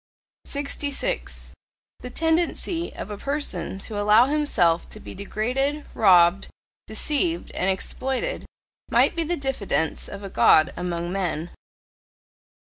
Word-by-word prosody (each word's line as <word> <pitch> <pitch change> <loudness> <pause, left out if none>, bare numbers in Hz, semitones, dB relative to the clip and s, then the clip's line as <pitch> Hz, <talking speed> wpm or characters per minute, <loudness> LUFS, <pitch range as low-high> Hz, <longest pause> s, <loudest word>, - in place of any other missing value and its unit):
66. 285 - -2 0.5
The 250 - -7
tendency 330 +3 0
of - - -6
a 205 - -6
person 280 - -3
to 210 0 -4
allow 210 +3 +6
himself 245 - +1
to 215 - -5
be - - -9
degraded, 255 +9 -2
robbed, 180 -2 +5 0.4
deceived, 305 - 0
and 185 - +1
exploited 265 - -2 0.4
might - - +4
be 335 - +1
the 345 +2 -2
diffidence 250 -12 -1
of 200 0 -8
a 195 - -6
God 155 - +5
among 175 -1 -3
men. 175 -3 -2
225 Hz, 115 wpm, -24 LUFS, 190-295 Hz, 0.5 s, allow